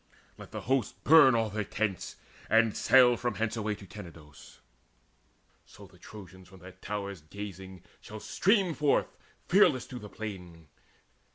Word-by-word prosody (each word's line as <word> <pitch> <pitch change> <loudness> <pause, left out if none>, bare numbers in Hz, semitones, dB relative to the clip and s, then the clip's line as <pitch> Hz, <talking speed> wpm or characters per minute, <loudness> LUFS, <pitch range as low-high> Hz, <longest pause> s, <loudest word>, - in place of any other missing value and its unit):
Let - - -12
the - - -7
host 130 -3 -1
Burn 145 -5 +7
all 110 -2 0
their 105 +1 -2
tents, 100 -2 -3 0.3
and 115 -1 +3
sail 125 -2 +5
from 120 -2 -3
hence 115 0 -2
away 110 -2 -2
To 100 - -13
Tenedos; 85 -7 -13 1.0
so - - -15
the - - -20
Trojans, 95 -3 -13
from 95 +1 -16
their 95 +1 -11
towers 100 -1 -6
Gazing, 95 +1 -10 0.2
shall 110 - -10
stream 195 - +1
forth 150 -2 0 0.3
fearless 175 - +4
to 125 - -9
the 105 - -10
plain. 90 -8 -9
105 Hz, 150 wpm, -29 LUFS, 95-120 Hz, 1.0 s, Burn